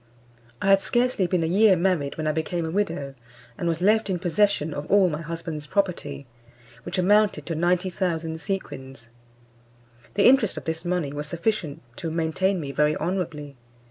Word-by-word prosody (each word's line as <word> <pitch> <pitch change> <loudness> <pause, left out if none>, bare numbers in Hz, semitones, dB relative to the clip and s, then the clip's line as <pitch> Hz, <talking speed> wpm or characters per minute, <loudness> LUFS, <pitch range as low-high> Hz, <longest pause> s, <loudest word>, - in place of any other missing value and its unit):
I 195 - +2
had 195 0 +6
scarcely 240 -6 +1
been 175 -2 +1
a - - +1
year 195 +4 +5
married 170 -5 0
when 155 - -3
I 155 - +2
became 160 +2 -2
a 160 - -3
widow, 165 -8 -2 0.4
and 175 -4 -3
was 165 0 -1
left 215 +2 +3
in 185 - 0
possession 175 -3 +1
of 145 +1 -6
all 195 -3 +5
my 150 +1 -4
husband's 165 -2 -6
property, 160 -8 -2 0.6
which 125 - -5
amounted 205 +3 +3
to 170 - -3
90,000 175 -1 -1
sequins. 135 - -5 1.1
The 200 - +3
interest 250 -6 +5
of - - -6
this 160 0 -3
money 175 -5 -1
was 145 +1 -4
sufficient 170 - -2
to 165 - -3
maintain 170 +4 0
me 140 -4 -5
very 150 +2 +2
honourably. 160 -6 -3
170 Hz, 170 wpm, -25 LUFS, 155-195 Hz, 1.1 s, had